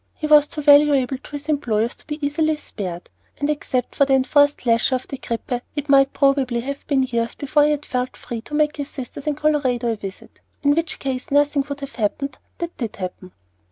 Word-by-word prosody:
He 310 - -4
was 300 -1 +6
too 300 -1 -6
valuable 285 -3 +5
to - - -15
his 290 0 -6
employers 235 -6 0
to - - -19
be 300 -1 -4
easily 310 +2 +1
spared, 180 -11 -6 0.3
and 285 +1 0
except 255 -4 -2
for - - +3
the 270 -1 +3
enforced 285 +2 +3
leisure 230 +2 +3
of 255 - -4
the 275 - -6
grippe 240 +1 -3
it 290 -1 -4
might 275 0 +5
probably 275 -4 +2
have 280 +3 -6
been 275 -3 +2
years 235 -2 -1
before 295 +1 +2
he 300 0 +2
felt 255 -3 -4
free 230 -2 -6
to 295 - -7
make 300 0 +2
his 285 0 -4
sisters 265 +2 -8
in 300 - +1
Colorado 270 -6 +1
a - - -1
visit, 195 -2 -9 0.2
in 285 0 +5
which 330 +2 -1
case 260 -2 -4
nothing 290 0 +3
would 285 0 -5
have 275 0 -7
happened 245 +6 -2 0.2
that 340 -1 -5
did 230 -5 -3
happen. 185 0 -7
275 Hz, 210 wpm, -22 LUFS, 245-295 Hz, 0.3 s, was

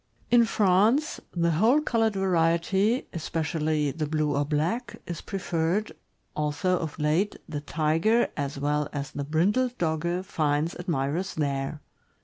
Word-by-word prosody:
In 240 -1 +6
France, 220 +7 +2
the 170 -1 +1
whole 220 - +4
colored 225 -7 +1
variety, 190 +5 +2
especially 155 -2 -1
the 155 +1 -3
blue 150 -1 0
or 145 - +2
black, 160 - -2
is 170 -2 -5
preferred, 185 +1 -1 0.4
although 150 +5 0
of 160 -3 -5
late 155 +7 +1
the 145 -2 -4
Tiger 165 +10 +2
as 140 -1 -3
well 145 +1 0
as 145 -1 -4
the 145 - -4
brindled 205 - +1
Dogge 170 +2 -1
finds 155 -2 0
admirers 170 +2 -2
there. 140 0 -2
165 Hz, 130 wpm, -27 LUFS, 150-195 Hz, 0.4 s, In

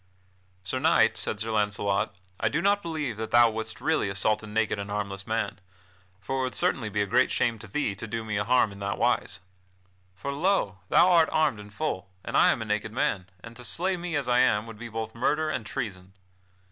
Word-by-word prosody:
"Sir 115 +7 -2
Knight," 130 -7 +4
said 110 -1 -2
Sir 110 +1 -2
Launcelot, 105 -1 0 0.2
"I - - +2
do 150 - 0
not 200 +3 +2
believe 155 - -3
that 110 0 -4
thou 120 -1 +6
wouldst 110 0 -5
really 160 -10 +1
assault 100 +2 +2
a 105 - -9
naked 105 -1 0
and 100 0 -5
harmless 100 -1 -4
man, 110 -1 -2 0.6
for 135 +7 -3
it - - +1
would 130 - -3
certainly 110 -5 +1
be 105 0 0
a - - -2
great 125 +6 +3
shame 115 -2 0
to 115 - -11
thee 105 0 -1
to 100 - -8
do 115 +1 -3
me 110 -1 -3
a 100 - +1
harm 120 -1 +3
in 100 - -11
that 100 -1 -2
wise. 95 - 0 0.7
For 140 +9 -4
lo! 145 - +1
thou 185 - +6
art 165 -2 +5
armed 155 -8 +2
in 105 0 -10
full, 95 -1 -3 0.2
and - - -4
I - - +6
am 115 - -2
a - - -8
naked 105 +1 -1
man, 100 -5 -1
and 115 0 -10
to 125 - -10
slay 185 +9 0
me 175 -2 -4
as 145 -3 -1
I 125 0 +3
am 105 -3 +3
would 115 -2 -10
be 120 0 -7
both 110 0 -5
murder 150 +6 0
and 125 -7 -4
treason." 95 -7 -5
110 Hz, 225 wpm, -27 LUFS, 105-135 Hz, 0.7 s, thou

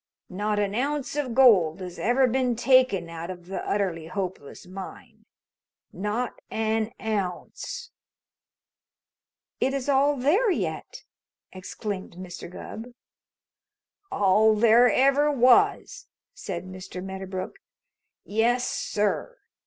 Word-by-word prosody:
Not 210 +3 -1
an 205 -1 0
ounce 280 +4 -2
of 265 -6 -2
gold 195 -11 +5
has 180 -1 -8
ever 250 +3 +3
been 250 0 +1
taken 250 -8 +3
out 165 +1 -7
of 175 -2 -8
the 190 +2 -5
Utterly 180 -6 -2
Hopeless 185 -5 -6
Mine. 185 +1 -10 0.7
Not 210 +5 -3
an 220 0 -1
ounce." 220 - -4 1.7
"It 270 +1 +1
is 275 -1 -3
all 280 +1 +3
there 345 - +3
yet!" 365 - -3 0.5
exclaimed 190 +1 -6
Mr. 180 -1 -8
Gubb. 230 +6 -9 1.2
"All 215 - +4
there 230 +2 +5
ever 275 +5 +3
was," 405 - +3 0.3
said 180 -2 -6
Mr. 185 0 -8
Medderbrook. 190 -1 -6 0.7
"Yes, 235 +4 +1
sir! 210 - -2
215 Hz, 105 wpm, -26 LUFS, 185-260 Hz, 1.7 s, gold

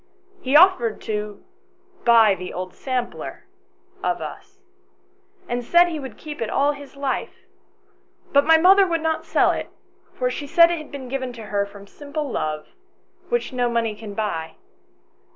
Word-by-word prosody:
He 265 +2 0
offered 300 - +5
to 210 -1 -5 0.6
buy 225 -3 +6
the 180 -1 -6
old 185 0 -6
sampler 255 -2 -4 0.6
of - - 0
us, 390 - -9 0.9
and 245 0 -2
said 345 +8 +5
he 320 -3 -4
would 265 -5 -8
keep 300 -3 -8
it 225 - -1
all 285 +4 +2
his 285 -1 -11
life; 275 -1 -4 0.9
but 280 0 +6
my 320 +2 +6
mother 380 +4 +6
would 335 -2 -1
not 320 0 -1
sell - - +3
it, - - -4 0.5
for - - 0
she 290 - -5
said 335 +3 +6
it 340 - -2
had 305 - -11
been 275 -2 -7
given 260 0 -3
to 230 -2 -9
her 205 -1 -1
from 200 0 -13
simple 290 +6 -6
love, 155 -5 -3 0.6
which 480 - -1
no 245 -1 +1
money 230 -2 0
can 210 -1 -9
buy. 165 -7 -3
260 Hz, 165 wpm, -22 LUFS, 215-310 Hz, 0.9 s, buy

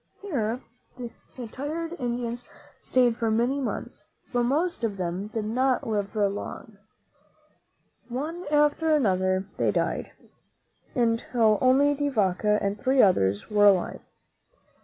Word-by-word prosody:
Here 250 - -2 0.4
the 245 0 -9
tired 310 +8 -4
Spaniards 245 -4 -3 0.4
stayed 245 -2 +2
for 230 - 0
many 240 +5 +1
months; 270 - -5 0.3
but 245 - +2
most 295 +5 0
of 210 -3 -1
them 180 +2 -3
did 215 0 -4
not 255 +4 +1
live 205 -2 -2
long. 205 0 -3 1.3
One 310 +8 -4
after 295 +1 +3
another 185 -7 +1
they - - +2
died, - - -1 0.8
until 230 -2 +2
only 270 +3 +4
De 290 0 -1
Vaca 210 -3 +1
and 200 +1 -1
three 265 +1 +2
others 100 - +3
were 205 -1 +5
alive. 190 -3 +2
235 Hz, 120 wpm, -26 LUFS, 205-270 Hz, 1.3 s, were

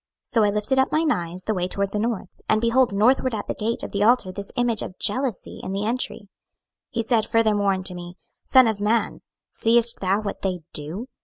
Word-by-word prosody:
So 225 - +1
I 205 - +3
lifted 210 +6 0
up 265 - +2
mine 315 0 +2
eyes 175 - -3
the 215 - -1
way 180 -2 -1
toward 200 +1 -2
the 210 - -2
north, 220 -4 -2 0.2
and 215 - +3
behold 235 +2 +2
northward 240 +4 +2
at 205 - -5
the - - -2
gate 225 +2 -2
of - - -5
the 200 - -2
altar 225 -4 +3
this 200 +1 -6
image 240 -3 0
of 185 - -7
jealousy 245 0 -1
in 190 - -5
the 200 +1 -2
entry. 240 +2 -1
26:008:006 205 - -20 0.6
He 230 -1 -2
said 225 -1 +1
furthermore 210 -4 +2
unto 185 -1 -3
me, 175 0 -9 0.3
Son 260 -2 +5
of 220 -2 -1
man, 220 +2 0 0.3
seest 235 +1 +3
thou 195 +2 +1
what 210 -2 -5
they 185 -3 -2
do? 165 - -3
215 Hz, 220 wpm, -23 LUFS, 195-235 Hz, 0.6 s, Son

